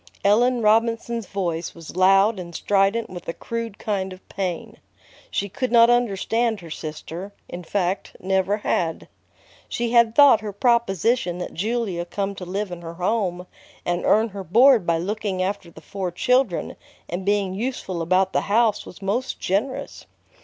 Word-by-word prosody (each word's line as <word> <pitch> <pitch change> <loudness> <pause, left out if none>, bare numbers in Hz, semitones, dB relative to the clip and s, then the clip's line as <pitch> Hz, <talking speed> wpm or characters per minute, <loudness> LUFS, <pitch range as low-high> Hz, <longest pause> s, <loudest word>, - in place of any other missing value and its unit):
Ellen 240 +4 +3
Robinson's 230 0 +1
voice 175 -4 -3
was 165 -1 -10
loud 195 +3 +4
and 170 -2 -8
strident 205 +3 +1
with 175 -1 -9
a 165 - -2
crude 230 -1 -5
kind 195 -3 -2
of 185 0 -13
pain. 185 -4 -4 0.5
She 200 - -1
could 240 +6 -3
not 235 0 +7
understand 230 -1 +1
her 165 -2 -11
sister, 165 +6 -7
in 175 +1 -7
fact, 190 +1 -2
never 190 +2 +1
had. 170 -5 -1 0.6
She 235 -1 -2
had 235 -2 +4
thought 280 -7 +7
her 210 -1 -5
proposition 230 - +1
that 180 - -6
Julia 210 -2 -2
come 200 +2 -3
to 190 -2 -8
live 195 +2 -3
in 175 -1 -7
her 165 0 -8
home 180 -1 -1 0.4
and 175 0 -1
earn 220 +2 +3
her 200 -1 -7
board 230 - +5
by 170 -1 +3
looking 200 +2 -3
after 195 -2 -3
the 160 - -14
four 190 +1 -4
children 250 0 +1 0.3
and 175 +3 -4
being 200 -1 +1
useful 195 -5 -3
about 185 +3 +2
the - - +2
house 220 0 +1
was 195 - -12
most 225 +7 -2
generous. 215 +8 -2
200 Hz, 160 wpm, -23 LUFS, 180-230 Hz, 0.6 s, not